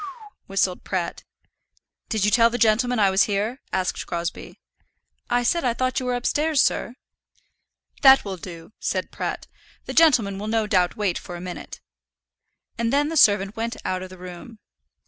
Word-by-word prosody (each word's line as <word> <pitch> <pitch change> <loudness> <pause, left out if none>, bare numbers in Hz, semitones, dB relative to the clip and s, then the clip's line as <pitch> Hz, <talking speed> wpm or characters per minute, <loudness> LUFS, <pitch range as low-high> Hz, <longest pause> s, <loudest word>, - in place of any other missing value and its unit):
"Whew - - -6
w 380 +6 -11
w 425 -2 -15
hew," - - -58
whistled 195 -2 0
Pratt. 185 -3 -3 0.9
"Did 215 -3 0
you 210 - +2
tell 230 +1 +5
the 240 - -3
gentleman 245 +2 +2
I 200 -3 +4
was 190 +2 +4
here?" 215 +5 -2
asked 185 -1 -2
Crosbie. 170 - -5 0.7
"I 245 0 +2
said 340 +7 +1
I 240 -2 +1
thought 255 +1 0
you 255 - -5
were 250 - 0
upstairs, 295 +5 0
sir." 245 - +1 1.1
"That 270 -3 +7
will 195 -2 -5
do," 170 +1 -10
said - - -2
Pratt. - - -4 0.4
"The - - -5
gentleman 230 -12 +4
will 210 - -5
no 220 0 +1
doubt 185 -4 +1
wait 200 -5 -1
for 175 - -9
a - - -7
minute." 180 0 -8 1.0
And 230 0 0
then 290 +2 +2
the 325 - -4
servant 205 -7 +4
went 230 +1 -3
out 185 0 -2
of 185 - -7
the 185 - -12
room. 180 +5 -10
215 Hz, 185 wpm, -23 LUFS, 185-250 Hz, 1.1 s, That